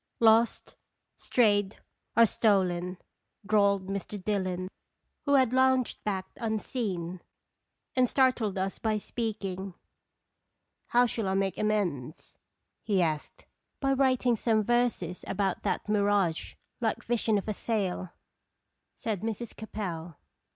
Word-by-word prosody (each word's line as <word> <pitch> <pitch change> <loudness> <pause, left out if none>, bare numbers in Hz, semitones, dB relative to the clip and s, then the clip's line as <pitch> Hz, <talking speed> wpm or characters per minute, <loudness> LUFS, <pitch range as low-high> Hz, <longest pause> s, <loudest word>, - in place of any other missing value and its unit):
"Lost, 225 +1 +3 0.4
strayed, 205 -4 +2 0.4
or 230 - +9
stolen," 185 -5 +1 0.5
drawled 200 -2 +3
Mr. 200 +1 -4
Dillon, 185 -2 -1 0.6
who 285 -1 +4
had 260 -3 +4
lounged 260 -1 +2
back 195 -3 -1
unseen, 205 -6 -3 0.7
and 255 -2 +3
startled 255 -7 +2
us 190 +1 -2
by 220 -1 0
speaking. 195 -4 -4 0.5
" - - -52
How 245 +1 +4
shall 225 -3 -2
I 190 - 0
make 195 -1 0
amends?" 180 -11 -2 0.5
he 200 -3 +1
asked. 155 -4 -2 0.2
" - - -52
By 275 -1 +2
writing 255 -2 +3
some 220 -1 +2
verses 240 -7 0
about 195 -2 -1
that - - -2
mirage 200 -5 +1 0.2
like 225 -3 -1
vision 225 -2 +1
of 200 - -4
a 215 - 0
sail," 195 -4 -2 0.9
said 210 -5 -3
Mrs. 225 +1 -4
Capel. 175 -7 -5
210 Hz, 120 wpm, -29 LUFS, 190-230 Hz, 0.9 s, or